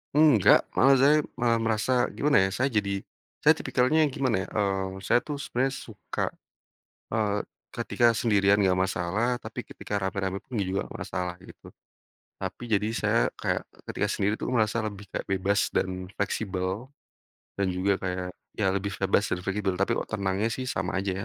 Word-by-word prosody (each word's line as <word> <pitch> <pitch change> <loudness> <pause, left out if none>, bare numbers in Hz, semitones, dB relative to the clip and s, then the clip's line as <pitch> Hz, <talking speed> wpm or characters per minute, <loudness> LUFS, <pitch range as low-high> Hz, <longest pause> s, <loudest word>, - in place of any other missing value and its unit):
Enggak, 150 - +6
malah 135 +1 +6
saya 145 +3 +6 0.2
malah 120 -1 +3
merasa 115 +1 0 0.2
gimana 140 -9 +3
ya 95 - +1
saya 130 +7 +1
jadi 100 -5 0 0.4
saya - - +6
tipikalnya 140 +6 +2
gimana 130 -9 0
ya, - - -8
eee, 95 -1 -1
saya 120 - +4
tuh 145 -2 -5
sebenarnya 130 0 0 0.2
suka, 105 -5 -6 0.9
eee, 105 -2 0 0.2
ketika 120 - 0
sendirian 100 -3 +3
enggak 95 -3 +3 0.2
masalah, 110 +9 0
tapi - - -7
ketika 100 -1 -5
rame-rame 95 0 -2
pun 125 - -6
juga 95 -1 -1
gak - - -9
masalah 90 -1 -3
gitu. - - -14 0.7
Tapi 95 +5 -5
jadi 105 -2 +1
saya, - - +2 0.2
kayak - - -1 0.3
ketika - - 0
sendiri 105 +2 0
tuh - - -3
merasa 110 +1 +2
lebih 105 -2 -5
kayak - - -4
bebas 95 +1 +1
dan 90 0 -2
fleksibel, 100 +2 -2 0.7
dan 100 - +2
juga 95 +2 +2
kayak, 90 -1 -3 0.3
ya 105 - 0
lebih 100 +1 -2
bebas 95 +2 +3
dan 90 - -7
fleksibel, 95 -1 -1
tapi 100 +5 0
kok - - -3
tenangnya 100 +1 0
sih 115 +3 -2
sama 90 -8 -2
aja 100 - -1
100 Hz, 165 wpm, -27 LUFS, 95-115 Hz, 0.9 s, Enggak